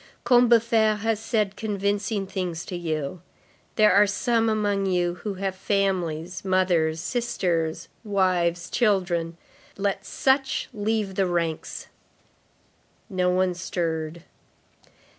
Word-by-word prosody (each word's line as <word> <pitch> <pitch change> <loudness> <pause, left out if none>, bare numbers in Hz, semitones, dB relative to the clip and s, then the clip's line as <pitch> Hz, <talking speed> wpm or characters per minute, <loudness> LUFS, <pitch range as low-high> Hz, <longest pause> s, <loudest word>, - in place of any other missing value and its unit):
Combeferre 230 -3 +4
has 225 -1 0
said 215 -3 -1
convincing 200 0 -1
things 180 -3 -4
to 180 - -6
you. 160 -1 -3 0.5
There 215 -1 +5
are 205 +1 +6
some 225 +3 +1
among 205 -2 0
you 175 -1 0
who 205 -2 -4
have 190 0 -3
families, 185 -4 -1
mothers, 180 -4 +2
sisters, 175 -7 -1 0.2
wives, 180 -4 0
children. 175 -7 +1 0.4
Let 200 -1 -1
such 270 0 0
leave 210 -2 -1
the 190 0 +1
ranks." 170 -2 -2 1.3
No 180 -1 +1
one 185 0 +2
stirred. 165 -2 -3
190 Hz, 105 wpm, -25 LUFS, 175-210 Hz, 1.3 s, are